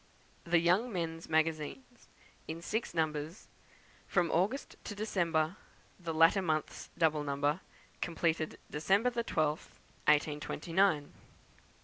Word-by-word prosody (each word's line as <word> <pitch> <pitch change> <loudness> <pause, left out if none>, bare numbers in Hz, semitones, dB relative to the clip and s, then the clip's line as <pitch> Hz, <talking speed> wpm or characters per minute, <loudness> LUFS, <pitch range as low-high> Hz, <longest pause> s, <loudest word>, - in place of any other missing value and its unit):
The 170 0 +4
Young 180 +9 +3
Men's 165 -3 -4
Magazines, 160 - -1 0.4
in 160 +1 -4
Six 220 -3 -2
Numbers, 155 +2 -2 0.6
from 175 -3 +2
August 200 +11 0
to 205 - -5
December, 175 -5 0 0.4
the 170 -2 -4
latter 165 +4 +5
months 155 -4 -2
double 155 -3 +2
number, 145 +3 0 0.4
completed 165 -2 0
December 195 +11 +2
the 235 -1 -1
12th, 155 -6 -1 0.3
1829. 150 +2 +2
165 Hz, 105 wpm, -33 LUFS, 155-190 Hz, 0.6 s, latter